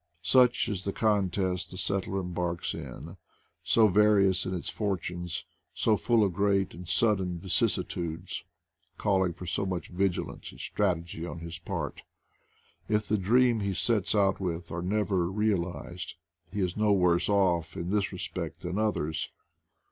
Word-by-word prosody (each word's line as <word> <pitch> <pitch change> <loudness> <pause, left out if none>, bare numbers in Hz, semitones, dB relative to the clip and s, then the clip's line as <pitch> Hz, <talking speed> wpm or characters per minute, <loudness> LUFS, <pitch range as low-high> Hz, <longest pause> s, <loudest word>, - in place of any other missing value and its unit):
Such 125 +7 +4
is 95 -3 -3
the 100 - -2
contest 95 -4 +1
the 90 - -8
settler 95 0 -1
embarks 90 -1 -2
in 85 +5 -8 0.2
— - - -42
so 115 - +7
various 100 -2 +4
in 95 - -2
its 90 - -5
fortunes, 90 -4 -3 0.3
so 110 - +3
full 115 +1 +3
of 95 -3 +1
great 100 0 +1
and 90 0 -9
sudden 95 -5 +2
vicissitudes, 85 -1 -1 0.5
calling 95 -3 +2
for 90 +2 -9
so 90 - -1
much 90 -4 -3
vigilance 90 0 -2
and - - -13
strategy 85 -1 -1
on 85 - -5
his 85 0 -6
part. 85 - -4 0.9
If 105 -1 +1
the 105 - +2
dreams 120 +3 +3
he 100 -1 -1
sets 110 -2 +1
out 100 -2 +3
with 85 -2 -3
are 85 - -3
never 95 -2 +1
realized, 90 -4 -2 0.4
he 105 - -2
is 90 -1 0
no 105 -1 +2
worse 90 -2 +3
off 90 -5 +2
in 85 +2 -3
this 105 -1 +1
respect - - -5
than 90 +4 -2
others. 80 -8 -1
95 Hz, 155 wpm, -29 LUFS, 85-105 Hz, 0.9 s, so